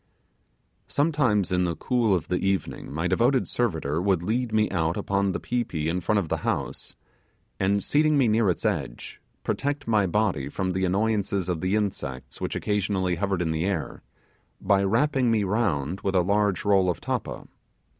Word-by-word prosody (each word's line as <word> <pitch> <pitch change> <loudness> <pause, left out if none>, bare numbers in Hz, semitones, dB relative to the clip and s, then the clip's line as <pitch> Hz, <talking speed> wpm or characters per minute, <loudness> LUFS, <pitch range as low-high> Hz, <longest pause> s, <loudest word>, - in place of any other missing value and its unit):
Sometimes 130 - +1
in 90 0 +2
the 85 -2 -1
cool 120 -6 +1
of 85 - -3
the 90 - -1
evening 95 -8 -2
my 80 +4 -2
devoted 120 +8 +2
servitor 80 -9 -1
would 95 -3 +1
lead 115 +5 -1
me 110 0 +3
out 85 -2 0
upon 100 0 0
the - - -3
pi 125 0 -1
pi 90 - -5
in 80 +4 -1
front 105 +5 +1
of 100 -5 0
the - - -1
house, - - -3 0.6
and 100 +1 +1
seating 155 0 +3
me 135 -4 +4
near 110 -1 +3
its 90 - -2
edge, - - -3 0.2
protect 145 -1 -2
my 105 -4 +3
body 90 -8 0
from 95 +4 -2
the 95 +1 0
annoyance 100 +2 0
of 90 -4 -1
the 95 +2 +1
insects 70 -12 -3
which - - -2
occasionally 100 -3 0
hovered 95 0 -1
in 80 - -1
the 80 +1 -1
air, 95 -5 -3 0.6
by 100 -1 +2
wrapping 125 +5 +2
me 110 -2 +2
round 95 - -1
with 95 -1 -1
a 90 - +5
large 100 +1 +1
roll 95 -2 +4
of 90 - -1
tappa. - - -4
100 Hz, 180 wpm, -26 LUFS, 90-110 Hz, 0.6 s, a